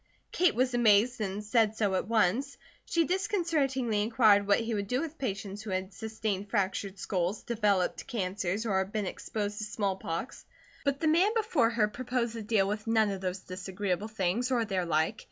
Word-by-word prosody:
Kate 360 -1 +3
was 255 +1 +1
amazed 235 0 +4
and 200 0 -3
said 220 0 +2
so 205 -3 +1
at 185 - -1
once. 230 +5 +1 0.3
She 335 -1 +2
disconcertingly 300 - 0
inquired 215 -2 +4
what 200 - +4
he 230 0 -2
would 200 -2 -2
do 250 +4 0
with 320 0 -5
patients 200 -4 -4
who 220 - -7
had 190 +1 -3
sustained 210 -1 -3
fractured 195 -1 -1
skulls, 185 +1 -2
developed 205 -6 0
cancers, 200 -2 -2
or 190 -3 +2
been 210 +1 -3
exposed 205 +2 -4
to - - -3
smallpox. 200 -1 -3 0.4
But 280 -1 0
the 320 - +2
man 365 +8 +3
before 415 - +2
her 230 -3 +2
proposed 245 +1 -2
to 230 - -5
deal 210 -2 +2
with 210 +2 -3
none 220 -2 +3
of 195 -1 -5
those 185 0 -3
disagreeable 190 +2 -3
things, 220 +3 -1
or 240 -3 +1
their 185 -4 -1
like. 160 +6 +1
215 Hz, 180 wpm, -30 LUFS, 195-240 Hz, 0.4 s, amazed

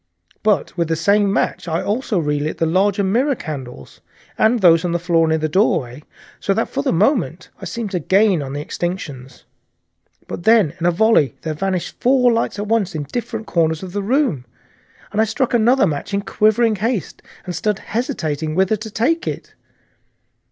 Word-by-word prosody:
But 210 -2 +1
with 170 -2 0
the 165 - 0
same 200 +5 +2
match 195 - -1
I 165 +1 -1
also 215 -1 -1
relit 150 -1 -1
the 165 - +1
larger 195 +4 +2
mirror 250 +9 +1
candles, 135 - -8 0.3
and 230 +2 +3
those 165 -4 +5
on 175 -1 -1
the - - +2
floor 170 -1 +2
near 160 0 +2
the 155 0 -1
doorway, 145 - 0 0.4
so 195 - 0
that - - -1
for - - -2
the - - 0
moment 180 - 0
I - - -6
seemed 225 -4 -4
to 180 - -1
gain 190 +1 +3
on 135 -1 -6
the 145 +1 -4
extinctions. 145 -8 -5 0.8
But - - -6
then 215 -6 +4
in 170 - +1
a - - +5
noiseless 170 - -3
volley 220 -10 +3
there 160 - -2
vanished 185 +2 -3
four 250 -1 +4
lights 230 -2 -1
at 205 - -3
once 210 -5 0
in 150 - -2
different 225 - -5
corners 160 -2 0
of 185 - -7
the 205 - -1
room, 220 - 0 0.7
and 210 - +1
I - - +4
struck 235 +4 -1
another 240 +2 +4
match 160 +4 -3
in 200 - -1
quivering 215 +1 +2
haste, 225 -1 -2 0.2
and 180 - -5
stood 210 -2 0
hesitating 160 - -3
whither 190 +4 +2
to 215 +2 -7
take 305 - 0
it. - - -5
190 Hz, 190 wpm, -19 LUFS, 160-220 Hz, 0.8 s, those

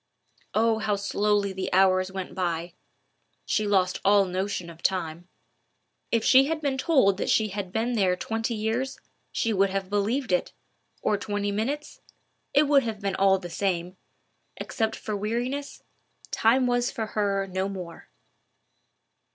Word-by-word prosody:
Oh, 220 0 +3
how 215 -1 0
slowly 200 0 0
the 190 0 -4
hours 185 0 +3
went 190 -1 -5
by! 170 -2 -2 0.7
She 215 -1 0
lost 185 -3 +1
all 200 0 +5
notion 185 -1 -3
of 170 0 -12
time. 175 -2 -2 0.8
If 230 -1 +2
she 265 +1 +6
had 315 +2 -1
been 280 -3 -1
told 260 - +3
that - - -2
she 220 -1 +3
had 195 -2 -5
been 225 +4 0
there 190 -5 +2
twenty 225 +4 -2
years, 225 +5 -2 0.3
she 230 -2 0
would 195 0 +3
have 195 0 -3
believed 220 +4 0
it—or 180 +3 -3
twenty 205 0 -2
minutes—it 280 +4 -3
would 285 -1 +5
have 225 -4 -4
been 200 -1 -2
all 195 0 +4
the 175 -2 -8
same: 180 0 -1 0.6
except 225 -2 -2
for 215 - -4
weariness, 240 +7 -3 0.5
time 250 +4 +3
was 245 0 +1
for 220 - -3
her 200 -2 0
no 190 +1 -2
more. 180 -4 -8
205 Hz, 145 wpm, -26 LUFS, 190-225 Hz, 0.8 s, she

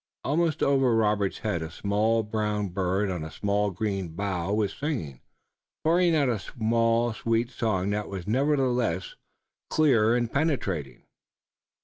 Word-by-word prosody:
Almost 160 +2 +1
over 135 -4 +3
Robert's 105 -3 +1
head 105 -6 0
a 80 - -4
small 105 +6 +1
brown 105 -1 -1
bird 95 +2 0
on 90 -4 -3
a 80 - -6
small 105 +3 0
green 95 -1 -3
bough 95 -1 -2
was 105 -1 0
singing, 120 - -4 0.6
pouring 170 +1 +3
out 145 -3 +3
a 115 -4 0
small 115 +2 +1
sweet 115 +2 -1
song 100 -5 -1
that 105 0 -2
was 95 -3 -6
nevertheless 125 - +1 0.6
clear 120 -7 +4
and 120 -2 -1
penetrating. 100 - -1
110 Hz, 135 wpm, -27 LUFS, 100-125 Hz, 0.6 s, clear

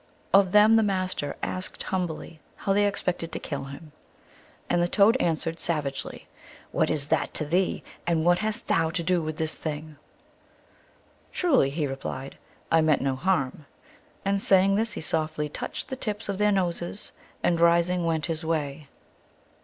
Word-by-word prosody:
Of 195 -2 +6
them 210 +2 +7
the - - +5
Master 185 -7 -1
asked 185 0 -3
humbly 175 -3 -3 0.2
how 195 - 0
they 205 +1 +3
expected 180 -4 -2
to - - -1
kill 140 -2 -5
him. 145 +3 -10 0.8
And 175 - +2
the 175 - +2
Toad 205 +5 +5
answered 165 -2 -1
sav 160 -3 0
agely, 135 -1 -5 0.2
" - - -21
What - - +1
is 145 -2 -1
that 160 -2 0
to 155 - +3
thee, 180 +5 0 0.2
and 165 -2 +1
what 175 0 +4
hast 215 0 -2
thou 165 -1 +2
to 170 +1 -2
do 180 0 +2
with 155 -1 -4
this 160 -2 -2
thing? 155 -1 -5 0.4
" - - -32
" - - -34
Truly," 275 - +3
he 150 +2 -1
replied, 135 0 -6 0.2
" - - -32
I 165 - +5
meant 155 -4 +3
no 135 -1 0
harm," 150 -3 -1 0.6
and 195 0 +1
saying 195 0 +4
this 215 +1 0
he - - -5
softly 155 -1 -1
touched - - -5
the 260 - -3
tips 215 -4 -3
of 200 -1 -2
their 210 0 +4
noses, 180 0 -2 0.3
and 170 -1 +2
rising 170 +1 +3
went 160 -2 0
his 165 -1 -3
way. 150 -2 -2
170 Hz, 180 wpm, -26 LUFS, 155-190 Hz, 0.8 s, them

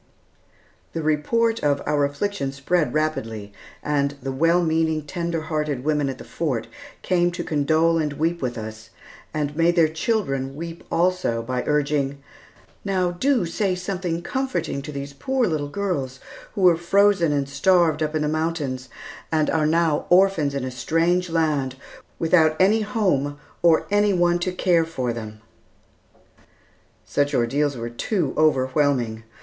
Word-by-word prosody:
The 165 - -3
report 225 +10 +1
of 145 -1 +2
our 145 -1 +2
affliction 145 0 -2
spread 150 +4 0
rapidly, 115 -10 -2 0.3
and 145 -1 0
the 135 0 -4
well 165 +6 +3
meaning, 160 -1 +1
tender 170 +1 -3
hearted 150 -4 -2
women 150 -2 +1
at 130 - -5
the - - -10
Fort 130 -9 -2 0.4
came 175 -1 +2
to 175 - -5
condole 160 +2 +2
and 150 -2 -1
weep 165 +3 -1
with 125 -2 -2
us, 110 0 -8 0.4
and 150 -1 -2
made 170 +2 +3
their 165 -2 +5
children 155 - -1
weep 165 +2 -7
also 175 -10 +1
by 125 +1 -2
urging, 145 -1 0 0.7
"Now, 185 -3 0
do 245 +3 +1
say 185 +3 -1
something 180 -2 -3
comforting 260 - -2
to 150 - -7
these 140 0 -6
poor 260 - 0
little 155 -6 -2
girls, 145 -9 -3 0.4
who 200 - -2
were 180 -3 +6
frozen 185 -1 +3
and 140 -2 0
starved 160 +2 +2
up 155 0 -1
in 155 - +1
the - - 0
mountains, 150 -5 -2 0.4
and 155 -2 +2
are 155 -2 +2
now 160 -1 +1
orphans 175 -6 +4
in 135 - -2
a 130 - -4
strange 170 +7 +1
land, 150 -5 0 0.4
without 160 -2 +3
any 210 +4 +4
home 180 -10 0 0.2
or 170 -2 +4
any 205 0 +3
one 175 -1 +2
to 180 +1 -1
care 180 -2 +2
for 130 -7 -3
them." 110 -2 -8 1.6
Such 145 0 0
ordeals 135 +3 +1
were 115 0 -5
too 160 - -1
overwhelming. 130 -6 +1
155 Hz, 150 wpm, -23 LUFS, 140-175 Hz, 1.6 s, were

